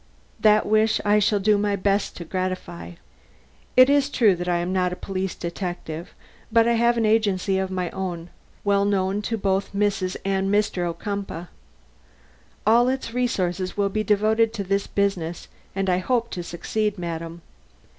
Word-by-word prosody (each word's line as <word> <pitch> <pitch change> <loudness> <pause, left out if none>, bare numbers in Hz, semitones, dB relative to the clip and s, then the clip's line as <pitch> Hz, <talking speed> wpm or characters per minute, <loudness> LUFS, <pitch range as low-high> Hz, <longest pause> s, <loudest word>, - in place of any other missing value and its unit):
That 215 0 +4
wish 215 +1 +3
I 205 +1 +4
shall 210 0 +2
do 205 +1 +3
my 205 0 +1
best 200 +1 0
to 170 - -7
gratify. 185 -1 -4 0.8
It 255 0 +9
is 285 0 +3
true 220 -9 +4
that 175 +1 -4
I 175 - +2
am 175 +2 -2
not 180 -1 +1
a - - -3
police 190 0 -4
detective, 170 -2 -5 0.4
but 230 0 +4
I 235 - +3
have 235 +1 +3
an 225 - +2
agency 200 -3 +2
of 190 0 -2
my 180 -2 -2
own, 175 -3 -5 0.3
well 200 -1 +2
known 200 0 0
to 225 +2 -2
both 195 -1 -1
Mrs. 200 -2 0
and 195 0 0
Mr. 205 -4 +1
Ocumpaugh. 195 -1 -5 1.2
All 235 +3 +5
its 260 -3 -3
resources 190 -7 -1
will 200 -1 +2
be 215 +2 -1
devoted 215 +2 +2
to 210 -3 -3
this 195 +1 -1
business 185 -4 -1 0.3
and 195 0 -1
I 180 -1 +2
hope 235 +3 0
to 180 - -4
succeed, 205 +5 -2
madam. 165 -1 -5
195 Hz, 165 wpm, -24 LUFS, 180-215 Hz, 1.2 s, It